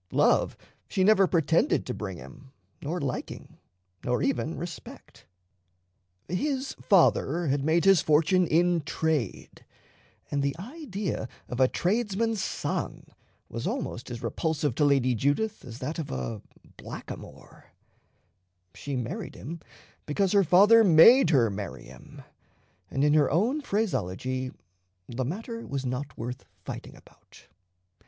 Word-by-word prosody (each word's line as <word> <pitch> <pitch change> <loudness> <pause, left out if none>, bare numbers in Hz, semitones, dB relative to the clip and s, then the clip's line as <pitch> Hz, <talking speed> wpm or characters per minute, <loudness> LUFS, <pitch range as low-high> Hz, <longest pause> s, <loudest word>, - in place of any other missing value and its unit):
Love - - +2 0.3
she 190 - 0
never 195 -1 +5
pretended 165 -1 +2
to 125 - -3
bring 95 -6 -5
him, 105 - -13 0.3
nor 170 +5 -3
liking, 140 -5 -5 0.4
nor 125 0 0
even 140 +4 -1
respect. 175 -1 -9 1.0
His 270 - -2
father 175 - +3
had 135 0 0
made 165 +4 +2
his 195 -4 +6
fortune 165 +4 +3
in 170 +2 +3
trade; 150 - -2 0.7
and 140 - 0
the 140 -1 0
idea 205 - -5 0.2
of 125 - -5
a 130 - +6
tradesman's 215 - 0
son - - -3 0.4
was - - -5
almost 120 - -4
as 120 0 -7
repulsive 145 +3 -1
to 150 - +2
Lady 135 -3 +3
Judith 145 - 0
as 120 -3 -9
that 150 +6 -4
of 150 -3 -4
a 115 -5 -4 0.4
blackamoor. - - -10 1.1
She 140 -1 -5
married 125 -2 -4
him 165 +5 -7 0.5
because 185 +6 +1
her 200 -1 +5
father 205 +7 +6
made 195 +6 +7
her 125 -9 +3
marry 100 0 -6
him, - - -13 0.7
and 135 - -1
in 150 0 +4
her 150 -2 +4
own 230 - +1
phraseology 130 - -2 0.6
"the 125 +2 -3
matter 225 - -5
was 135 -1 -3
not 130 +3 -4
worth 120 +2 -5 0.2
fighting - - -7
about." - - -20
155 Hz, 130 wpm, -27 LUFS, 130-195 Hz, 1.1 s, made